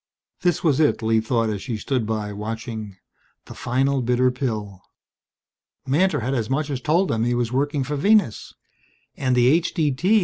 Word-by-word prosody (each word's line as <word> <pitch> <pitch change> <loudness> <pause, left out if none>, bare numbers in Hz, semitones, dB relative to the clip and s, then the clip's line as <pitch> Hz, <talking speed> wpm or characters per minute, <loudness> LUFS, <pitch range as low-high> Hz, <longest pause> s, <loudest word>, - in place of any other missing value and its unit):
This 175 -4 +1
was 150 -4 +2
it, 150 -6 +2
Lee 110 0 +3
thought 115 -1 0
as 100 -2 -4
she 115 -1 -4
stood 120 0 -2
by, 105 -2 -3
watching 110 -1 -6 0.5
the - - -10
final 135 +2 0
bitter 125 +1 +2
pill. 110 -7 -4 1.0
Mantor 150 +2 +2
had 130 +4 -1
as 115 -4 -1
much 145 +2 -1
as 130 -2 -3
told 170 +8 +2
them 115 0 0
he 120 +1 +1
was 120 -1 -1
working 140 +2 0
for 145 +3 -3
Venus. 200 - +2 0.6
And 130 -2 0
the 120 -1 +4
H.D.T. 165 +5 +2
125 Hz, 170 wpm, -23 LUFS, 115-145 Hz, 1.0 s, the